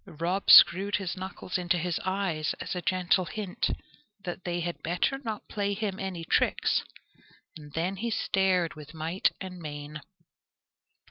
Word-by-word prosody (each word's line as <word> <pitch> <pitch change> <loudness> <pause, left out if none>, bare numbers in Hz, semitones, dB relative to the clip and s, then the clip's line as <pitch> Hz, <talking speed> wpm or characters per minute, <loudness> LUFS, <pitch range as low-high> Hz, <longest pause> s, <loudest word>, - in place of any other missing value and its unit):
Rob 180 +4 -1
screwed 200 +3 +8
his 190 -3 -2
knuckles 185 0 -4
into 175 0 +1
his 175 0 -1
eyes, 185 -5 -1
as - - -4
a 180 - -3
gentle 185 +1 +2
hint, 200 -1 -2 0.5
that 180 +1 -6
they 175 -1 -1
had 175 0 -4
better 180 - 0
not 220 -6 -5
play 200 -1 -1
him 200 -2 -3
any 185 -4 -4
tricks, - - +2 0.7
and 150 -2 -11
then 180 +4 -2
stared 190 -5 +1
with 150 +1 -12
might 165 +4 +1
and 185 -2 -7
main. 150 -1 -7
180 Hz, 145 wpm, -28 LUFS, 165-195 Hz, 0.7 s, screwed